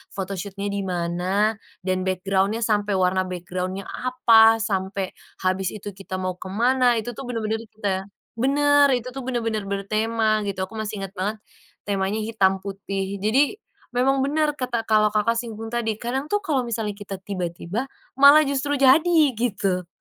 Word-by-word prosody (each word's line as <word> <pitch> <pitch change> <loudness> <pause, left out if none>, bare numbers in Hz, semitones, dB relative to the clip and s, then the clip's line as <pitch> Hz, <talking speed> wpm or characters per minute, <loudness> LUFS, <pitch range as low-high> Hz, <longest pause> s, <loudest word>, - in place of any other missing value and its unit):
photoshoot-nya 195 +1 -4
di 200 0 -2
mana 180 +4 0 0.3
dan 185 0 0
background-nya 195 +3 0
sampai 210 -2 +1
warna 185 0 +2
background-nya 185 +2 -4
apa, 225 -3 +5
sampai 190 -2 -2 0.3
habis 185 0 +1
itu, 205 -1 -7
kita 195 -1 -7
mau 185 -1 -2
ke - - -7
mana, 245 +3 +3
itu 240 +2 -5
tuh - - -6
benar-benar 220 -2 -2
kita 200 -3 -3 0.3
benar, 285 +2 +4
itu 245 0 -4
tuh 270 -1 -6
benar-benar 225 -4 -1
bertema, 215 +2 0
gitu. 195 -1 -4
Aku 220 - -13
masih 215 -1 -4
ingat 195 0 -7
banget, 205 +3 -2 0.5
temanya 200 +1 0
hitam 195 -3 +1
putih 195 0 -4
jadi, 275 - +3 0.4
memang 270 +2 +3
benar 300 +1 +1
kata, 240 -3 -2
kalau 215 0 +5
Kakak 230 +2 +2
simpulin 225 -2 -6
tadi, 225 -3 -1
kadang 260 +4 -2
tuh 415 0 +2
kalau 295 -8 +1
misalnya 225 -3 -2
kita 200 -2 -7
tiba-tiba, 185 +5 -4 0.3
malah 285 +2 +9
justru 280 +1 -1
jadi, 315 +6 +5 0.2
gitu. 195 -6 -1
215 Hz, 155 wpm, -23 LUFS, 195-240 Hz, 0.5 s, malah